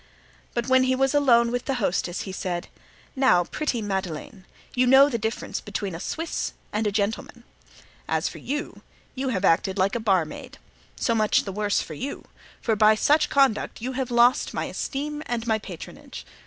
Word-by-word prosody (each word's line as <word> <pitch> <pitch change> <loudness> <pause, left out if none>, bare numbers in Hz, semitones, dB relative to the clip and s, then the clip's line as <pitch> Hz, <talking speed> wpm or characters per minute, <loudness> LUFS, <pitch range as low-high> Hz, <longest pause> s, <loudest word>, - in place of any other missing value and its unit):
But 235 -1 -1
when 260 0 +4
he 260 0 +2
was 270 +1 +1
alone 235 -5 +4
with 245 0 -2
the 270 - -1
hostess 185 -5 -1
he 190 - -6
said: 180 -2 -4 0.5
"Now, 260 -10 +4
pretty 245 - -2
Madeleine, 190 -1 -4 0.3
you 250 0 +2
know 270 +3 +7
the 235 -4 -2
difference 220 +1 -3
between 200 -2 -4
a 165 - -6
Swiss 325 - -3 0.2
and 210 +1 0
a - - 0
gentleman. 220 +3 -2 0.6
As - - 0
for - - -7
you, 295 +2 -4 0.3
you 265 0 -2
have 195 -5 0
acted 190 +3 +2
like 195 +2 +2
a 235 - -1
barmaid. 220 - -1 0.4
So 230 - 0
much 215 -2 +2
the 195 - -5
worse 205 +1 0
for 160 - -8
you, 275 - -5 0.4
for 225 - +1
by 215 +1 +5
such 300 +7 +3
conduct 270 -6 +2
you 250 +3 -3
have 260 -1 -3
lost 240 +1 +3
my - - -1
esteem 295 +2 -4
and 240 -1 -2
my 220 -2 +1
patronage. 185 -6 -9
230 Hz, 180 wpm, -25 LUFS, 200-260 Hz, 0.6 s, know